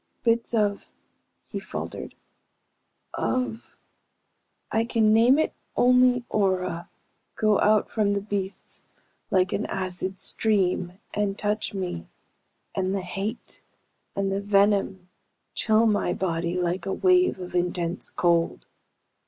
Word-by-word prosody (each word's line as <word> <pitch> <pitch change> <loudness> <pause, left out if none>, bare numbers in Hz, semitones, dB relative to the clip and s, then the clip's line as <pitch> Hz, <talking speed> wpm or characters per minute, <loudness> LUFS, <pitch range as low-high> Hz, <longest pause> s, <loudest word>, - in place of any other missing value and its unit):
"Bits 230 0 +2
of 205 -2 0 0.3
..." - - -49
He - - -3
faltered. - - -6 1.0
"Of... 250 -3 -2 1.0
I 225 - +2
can 225 -2 +3
name 235 +5 +6
it 315 - +1 0.2
only 250 0 +4
aura, 185 -4 0 0.5
go 215 -2 +3
out 215 0 +3
from 205 -2 +1
the 200 - -1
beasts 200 -1 -5 0.5
like 185 -1 +2
an 215 - -1
acid 185 0 -3
stream, 185 -4 0 0.2
and 205 -1 -1
touch 210 0 -2
me, 180 - -4 0.7
and 190 0 -1
the 195 - -1
hate, 200 +5 -5 0.5
and 195 0 0
the 195 +1 -1
venom 200 -2 +2 0.5
chill 220 +1 +3
my 205 -5 +2
body 170 -1 -1
like 180 +2 -1
a 190 - 0
wave 365 - +3
of 180 -1 -7
intense 175 0 -1
cold. 170 -1 +1
200 Hz, 120 wpm, -26 LUFS, 185-220 Hz, 1.0 s, name